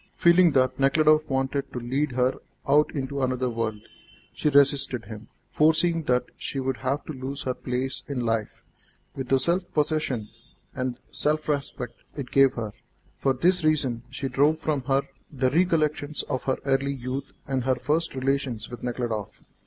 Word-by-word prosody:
Feeling 170 -1 +5
that 130 0 +2
Nekhludoff 155 +3 +4
wanted 135 +1 -1
to 125 - -3
lead 135 +4 -1
her 125 +1 +1 0.3
out 145 +2 +4
into 140 0 -2
another 130 -1 0
world, 110 -2 -3 0.5
she 150 - +1
resisted 140 -4 +3
him, 110 +1 -9 0.2
foreseeing 160 +1 +3
that 125 -2 +2
she 135 - -3
would 130 -1 -1
have 135 +2 -2
to 155 - -5
lose 135 +1 -5
her 130 - -1
place 130 +1 -3
in 140 -3 -2
life, 115 -2 -2 0.5
with 135 -2 -4
the 135 - +4
self 170 +8 0
possession 150 -8 0 0.4
and 130 -3 -3
self 155 +1 -1
respect 140 -5 -3
it 135 -4 -6
gave 135 -1 +5
her. 110 -5 -4 0.5
For 135 - +2
this 180 +6 +2
reason 140 -7 +1
she 135 +1 -3
drove 145 +4 +3
from 155 -3 -1
her 135 0 +2 0.3
the 130 -3 +1
recollections 155 -3 +1
of 130 - -3
her 130 - +1
early 140 0 +1
youth 130 +2 -5
and 135 -2 -1
her 130 -1 +3
first 150 +5 -1
relations 130 -4 -1
with 120 - -8
Nekhludoff. 120 -4 -3
135 Hz, 165 wpm, -26 LUFS, 125-150 Hz, 0.5 s, Feeling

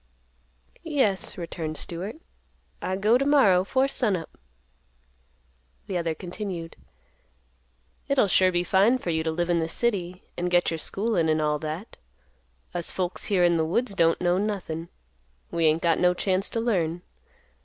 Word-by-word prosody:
"Yes," 260 - 0
returned 165 -3 -5
Stewart; 180 +6 -5 0.7
"I 185 - -2
go 215 +6 +3
to - - +1
morrow 205 -11 +5
'fore 260 +7 +1
sun 240 -7 +1
up." 165 -3 -7 1.5
The 195 - -5
other 165 -2 -1
continued; 180 -2 -6 1.3
"It'll 275 -5 +3
sure 185 -1 +4
be 175 0 +1
fine 195 +8 +3
for 180 -9 -3
you 160 0 0
to 160 - -1
live 175 +2 -1
in 170 - +2
the 160 - -1
city 185 -5 -1
and 175 0 -2
get 175 -1 +3
your 165 - -3
schoolin' 195 -3 0
and 155 0 +2
all 150 -1 0
that. 160 +7 -6 0.8
Us 175 -1 0
folks 180 -1 -2
here 195 -4 +2
in 170 -1 +4
the 160 - +2
woods 200 +8 0
don't 165 -3 +3
know 175 +1 +2
nothin'. 180 -6 -3 0.6
We 170 -1 +1
ain't 155 +2 +2
got 165 -1 +3
no 180 0 +3
chance 190 +1 0
to 230 - -2
learn. 175 -7 0
180 Hz, 160 wpm, -26 LUFS, 165-205 Hz, 1.5 s, morrow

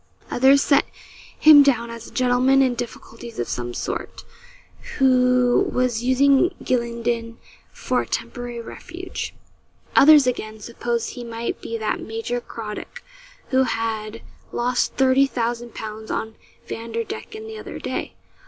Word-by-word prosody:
Others 270 +3 +5
set 280 -1 +4 0.5
him 305 -2 +9
down 235 -4 +2
as 230 0 -9
a - - -13
gentleman 255 +2 +3
in 255 -2 +2
difficulties 235 -1 -8
of 120 - -2
some 120 -1 -3
sort, - - -5 0.7
who 250 -2 +4
was 250 -2 0
using 275 +7 +4
Gylingden 235 -1 -1 0.3
for - - -1
a - - -7
temporary 245 -2 -4
refuge. 360 +9 -7 0.6
Others, 295 -1 +8
again, 220 -3 -3
supposed 235 +1 -3
he 245 - -8
might 230 0 -4
be 230 - -4
that 220 -1 -2
Major 225 +2 -4
Craddock 215 -3 -8 0.5
who 260 0 +3
had 225 -3 -2 0.3
lost 245 +1 0
thirty 265 +1 +4
thousand 240 -2 -3
pounds 220 0 -7
on 220 0 -3 0.3
Vanderdecken 230 - -5
the 440 0 -8
other - - -8
day. - - -4
240 Hz, 130 wpm, -22 LUFS, 230-265 Hz, 0.7 s, him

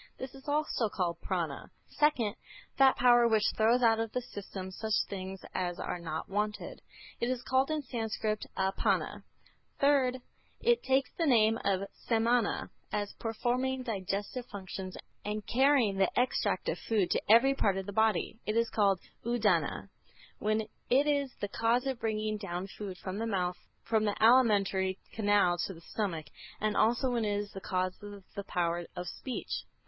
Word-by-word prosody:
This 260 0 -7
is 270 +2 -14
also 290 -6 0
called 175 -4 -2
Prâna. - - -3 0.2
Second, 260 -9 +1 0.4
that 270 -1 +7
power 240 -1 +6
which 220 -2 +3
throws 235 +3 +3
out 225 -1 +5
of 225 -1 -2
the 250 - 0
system 195 -4 -7
such 220 +3 -1 0.2
things 190 -1 -5
as 175 -1 -2
are 180 - -3
not 160 -2 -4
wanted. 210 +1 -3 0.4
It 235 - 0
is 255 -1 -2
called 260 +2 +2
in 310 -1 -1
Sanskrit 220 -4 -2
Apâna. 190 0 0 0.6
Third, 275 -3 +3 0.4
it 475 0 +3
takes 265 0 +1
the 330 - +2
name 225 -3 +4
of 195 0 0 0.2
Samâna, 230 -1 +2 0.2
as 205 -1 -2
performing 250 +3 -1
digestive 205 +2 -3
functions 190 -2 -7 0.3
and 210 0 -3
carrying 255 -5 +3
the 195 -1 +3
extract 250 - 0
of - - -1
food 210 -6 0
to - - +2
every 235 +5 +7
part 200 -8 +1
of 195 - -3
the 200 - -6
body. 220 +1 +1
It 215 +1 0
is 230 -1 +2
called 200 -3 +3 0.2
Udâna 205 -7 +1 0.5
when 215 +1 +1 0.3
it 270 +4 +4
is 285 -2 +1
the 205 - -2
cause 230 +5 +1
of 265 -3 -2
bringing 215 -1 -1
down 185 -3 -4
food 195 -3 -6
from 185 +2 -5
the 230 - -1
mouth 180 -4 -1 0.3
through 220 -1 +2
the 205 - 0
alimentary 200 -6 +4 0.2
canal 205 -5 +3
to 190 - -7
the 165 - -13
stomach, 170 -5 -3 0.3
and 215 0 0
also 240 +4 +3
when 235 -2 0
it 205 -1 0
is 205 0 -4
the 195 - -8
cause 185 0 -1
of 205 -1 -9
the 200 - -4
power 170 -1 -1
of 180 0 -5
speech. 260 - -4
215 Hz, 170 wpm, -31 LUFS, 195-245 Hz, 0.6 s, that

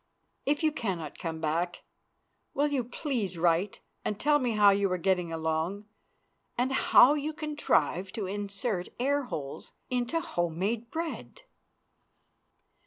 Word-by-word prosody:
If 290 +3 +1
you 310 - +4
cannot 185 - -4
come 165 -2 -4
back 165 +3 -1 0.7
will 285 - +3
you 275 -3 0
please 235 - -3
write 170 +3 +1 0.2
and 210 - -2
tell 295 0 +4
me 245 -4 0
how 205 -1 +6
you 200 -1 +1
are 185 - +1
getting 180 -2 +1
along 160 +5 -2 0.7
and 250 +2 +1
how 265 0 +6
you 300 +1 -2
contrive 295 - 0
to 220 -4 -3
insert 200 0 -3
air 280 +2 +1
holes 140 - -6 0.2
into 250 +6 0
home 175 - -2
made 225 +5 -1
bread? 335 - -5
205 Hz, 135 wpm, -29 LUFS, 175-275 Hz, 0.7 s, how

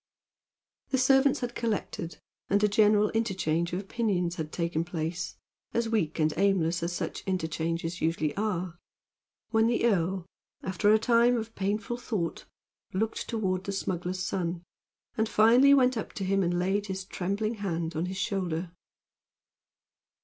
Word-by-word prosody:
The 265 - +1
servants 270 +2 +4
had 245 -1 -3
collected 210 -7 -3 0.3
and 200 +1 +3
a - - +6
general 210 0 +4
interchange 185 -7 0
of 180 - -1
opinions 195 -4 -1
had 155 -2 -4
taken 170 -1 -1
place 170 0 -4 0.4
as 230 -1 +1
weak 205 -9 0
and 155 -1 +2
aimless 175 -4 +2
as 170 +1 -1
such 175 - -4
interchanges 165 -1 -2
usually 155 -2 0
are 185 -5 -2 0.7
when 225 0 +4
the 235 0 +1
earl, 190 -4 +1 0.4
after 190 +3 +2
a 215 - +7
time 235 +2 +4
of 225 0 -5
painful 205 +4 -2
thought, 210 -9 -3 0.5
looked 220 +4 -1
toward 190 -5 -1
the 200 - -2
smuggler's 185 -1 -2
son, 175 -2 -2 0.5
and 220 0 +1
finally 235 +6 +6
went 255 -2 +5
up 220 - -4
to 195 - -4
him 195 +1 +2
and 175 -1 +1
laid 195 +3 0
his 190 -1 -4
trembling 200 +5 -2
hand 165 -4 -2
on 165 +3 -1
his 190 +1 -5
shoulder. 180 -4 -2
190 Hz, 150 wpm, -28 LUFS, 170-220 Hz, 0.7 s, a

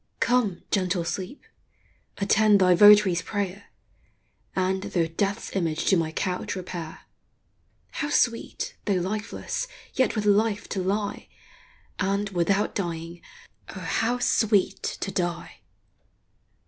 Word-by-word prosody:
Come, 235 -7 +1
gentle 185 -3 +1
sleep! 185 - -5 0.7
attend 205 +1 +4
thy 185 -1 +5
votary's 205 -2 +7
prayer, 200 +1 -4 0.9
Ynd, 190 0 +1
though 170 -3 +2
death's 195 +6 -3
image, 165 -4 -1
to 195 - +4
my 165 -2 0
couch 180 +4 -2
repair; 175 -3 -7 0.9
How 295 - -3
sweet, 235 -5 0
though 200 - +1
lifeless, 210 - -3 0.3
yet 260 - +1
with 210 -1 -1
life; 210 0 +2
to 190 - -2
lie, 200 +2 -2 0.7
And, 200 +2 0
without 195 +3 +1
dying, 170 -2 -4 0.5
O - - -6
how 240 +2 0
sweet 220 -5 +2
to 195 - -4
die 175 -2 -3
195 Hz, 115 wpm, -25 LUFS, 180-210 Hz, 0.9 s, votary's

